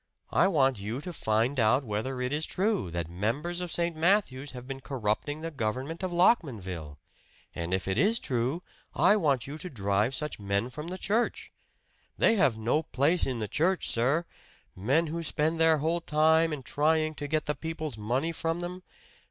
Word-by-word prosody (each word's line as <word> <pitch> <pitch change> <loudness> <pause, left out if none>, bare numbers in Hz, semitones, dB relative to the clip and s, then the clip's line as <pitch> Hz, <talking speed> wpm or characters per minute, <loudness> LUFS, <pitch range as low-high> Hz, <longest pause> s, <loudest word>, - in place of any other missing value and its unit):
I - - +4
want 135 - +2
you 110 +6 -4
to 175 +4 -6
find 115 +1 +1
out 120 +5 +4
whether 120 +4 -3
it 125 +2 -1
is 155 +1 -1
true 200 - 0
that 85 -1 -3
members 120 - -2
of 175 -2 -4
St. 170 -1 0
Matthew's 155 -5 +1
have 125 0 -9
been 135 0 -6
corrupting 135 +3 -2
the 165 0 -4
government 135 - -3
of 185 -1 -2
Lockmanville. 105 - +1 0.6
And 85 +1 -4
if 95 0 -1
it 95 - 0
is 220 +4 +4
true, 130 - -1 0.3
I 180 +8 +5
want 145 - +1
you 145 +3 -7
to 180 - -5
drive 105 - 0
such 150 -5 -3
men 100 +4 -1
from 150 +5 -6
the 185 +2 -4
church! 220 +5 -1 0.7
They - - +4
have 140 - +3
no 115 +8 +1
place 155 +4 +1
in 130 -2 -2
the 110 -2 -3
church, 175 - +1
sir! 135 +8 +1 0.5
Men 135 - +2
who 165 +2 -3
spend 160 +1 0
their 160 -1 +5
whole 165 +4 0
time 160 +1 +3
in 145 -3 -4
trying 155 +3 +1
to 145 -1 -5
get 155 +1 0
the 150 - 0
people's 155 -4 -5
money 125 +10 0
from 165 +1 -2
them! 180 +1 -5
145 Hz, 185 wpm, -29 LUFS, 115-165 Hz, 0.7 s, I